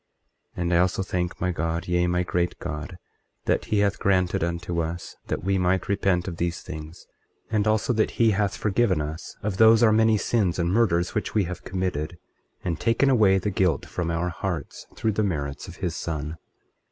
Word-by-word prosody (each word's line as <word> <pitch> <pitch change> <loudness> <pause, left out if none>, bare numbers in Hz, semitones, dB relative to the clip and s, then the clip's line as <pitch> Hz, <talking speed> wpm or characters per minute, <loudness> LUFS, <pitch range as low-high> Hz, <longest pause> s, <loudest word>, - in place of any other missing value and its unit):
24:10 - - -2
And 85 0 0
I - - +5
also 90 +1 +2
thank 90 -1 -2
my 90 - 0
God, 85 +1 -2
yea, 90 0 +2
my 90 +1 +1
great 90 0 -1
God, 85 +2 -6 0.5
that - - +1
he 105 -1 +1
hath 100 -1 +1
granted 90 -4 +2
unto 85 0 -2
us 85 +1 -5
that - - -3
we 95 0 +1
might 90 +1 +1
repent 95 -3 +1
of 85 -3 -5
these 85 -1 -2
things, 80 -1 -9 0.5
and 105 -1 +1
also 110 +3 +2
that 110 -1 +2
he 115 -2 +5
hath 100 -1 0
forgiven 105 -4 +2
us 75 +3 -5
of 100 -2 -2
those 110 +1 +7
our 110 - +6
many 110 0 +4
sins 100 -5 +1
and 85 -1 +1
murders 90 -5 +2
which 105 0 -2
we 105 - +4
have 90 0 -6
committed, 90 -4 -3 0.5
and 85 -3 -2
taken 125 +4 +3
away 105 -6 +5
the 100 +2 -1
guilt 90 -5 +1
from 85 -2 -3
our 85 +2 0
hearts, 85 -4 -5
through 110 - 0
the 105 +1 0
merits 70 -7 -3
of - - -9
his - - -3
Son. 80 -1 -4
90 Hz, 200 wpm, -25 LUFS, 85-100 Hz, 0.5 s, those